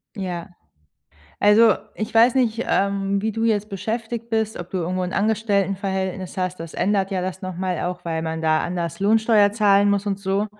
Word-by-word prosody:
Ja. 180 -3 -5 0.9
Also 210 +1 +6 0.2
ich 215 - -5
weiß 230 +2 +6
nicht, 240 -3 +1
ähm, 200 0 0
wie 220 - 0
du 225 +1 -2
jetzt 210 -2 +1
beschäftigt 225 +3 -4
bist, 220 -1 -1
ob 175 0 -8
du 190 - -2
irgendwo 180 +2 -2
'n 180 0 -3
Angestelltenverhältnis 195 -3 -1
hast, 185 -1 -2
das 165 -1 -8
ändert 195 0 0
ja 190 -2 -1
das 185 +1 -5
noch 185 -2 -5
mal 185 -1 -2
auch, 180 0 -4
weil 165 -1 -2
man 160 0 -3
da 155 -1 +2
anders 170 -1 -4
Lohnsteuer 215 0 +4
zahlen 205 -2 +4
muss 200 0 0
und 195 -1 -1
so. 195 +1 -1
195 Hz, 185 wpm, -22 LUFS, 185-215 Hz, 0.9 s, Also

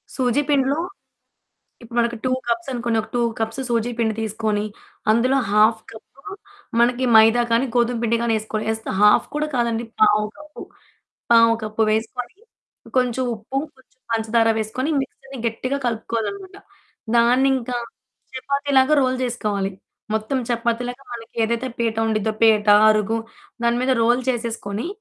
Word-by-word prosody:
సూజీ 255 +1 +1
పిండిలో 275 0 +2 1.1
ఇప్పుడు 235 +1 -10
మనకు 235 0 0
2 255 - +1 0.2
కప్స్ 235 +2 -1
అనుకోండి, 235 -2 -1
ఒక 215 - -12
2 245 - +1 0.2
కప్స్ 225 +4 -3
సూజీ 235 0 0
పిండి 220 -2 +1
తీసుకొని 215 -1 -1 0.5
అందులో 250 +4 +3
½ 215 +2 +4
కప్పు, 220 - -13 0.7
మనకి 245 +2 +2
మైదా 225 +2 +6
కానీ, 235 +4 +3
గోధుమ 240 0 +1
పిండి 235 0 +2
గానీ, 235 -1 +1
ఏసుకోవాలి. 215 0 -4
ఏస్తే 220 0 -6
½ 210 0 +5
కూడా 300 +1 0
కాదండి 235 -1 0 0.2
పావు 210 0 +5
కప్పు 300 0 -11 0.7
పావు 230 0 +6
కప్పు 215 +1 -1
వేసుకొని, 240 - -3 0.6
కొంచెం 250 0 0
ఉప్పు, 220 +5 -8 0.2
కొంచెం 260 0 -26
పంచదార 225 0 +2
వేసుకొని 220 +6 -3
ఈ - - +1
మిక్స్‌చర్‌ని 270 0 -8
గట్టిగా 255 +4 -2
కలుపుకోవాలనమాట. 240 - -4 0.6
దాన్నింకా 250 +1 +2 0.6
చపాతీలాగా 280 +1 +2
రోల్ 255 0 +1
జేసుకోవాలి. 210 -5 -2 0.4
మొత్తం 220 +5 -1
చపాతీలాగా 240 +2 -2
మనకేదైతే 235 +1 -2
పీట 230 -2 -1
ఉండిద్దో 220 -1 0
పీట, 220 -2 +4 0.2
అరుగు 215 +1 +2 0.4
దాని 235 0 +2
మీద 260 +1 +2
రోల్ 240 +2 +3
చేసేసుకొని 230 -2 -3
235 Hz, 135 wpm, -21 LUFS, 220-255 Hz, 1.1 s, మైదా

